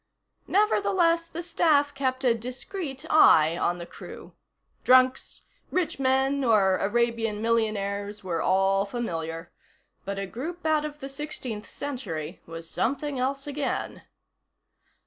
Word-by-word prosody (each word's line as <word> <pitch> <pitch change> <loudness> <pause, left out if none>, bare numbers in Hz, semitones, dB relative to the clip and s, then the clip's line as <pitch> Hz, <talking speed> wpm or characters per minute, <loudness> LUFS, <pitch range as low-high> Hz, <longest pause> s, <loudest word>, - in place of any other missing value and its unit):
Nevertheless, 345 -5 +2
the 340 +2 -6
staff 310 -4 +2
kept 260 -1 -2
a 245 -2 +4
discreet 265 - -6
eye 160 - +6
on 175 0 0
the 170 - -7
crew. - - -11 0.5
Drunks, 255 +1 +3 0.3
rich 360 -6 -1
men 270 +1 +2
or 200 -6 +3
Arabian 225 0 0
millionaires 210 -2 -1
were 170 -3 -2
all 195 +1 +3
familiar. 165 -7 -4 0.5
But 200 0 -4
a 195 - -2
group 320 - -7
out 310 -1 +2
of 295 0 -7
the 270 - -5
Sixteenth 270 -6 -5
Century 190 - -5
was 165 0 -8
something 280 - -2
else 275 +2 -1
again. 290 -1 -3
250 Hz, 125 wpm, -26 LUFS, 200-290 Hz, 0.5 s, eye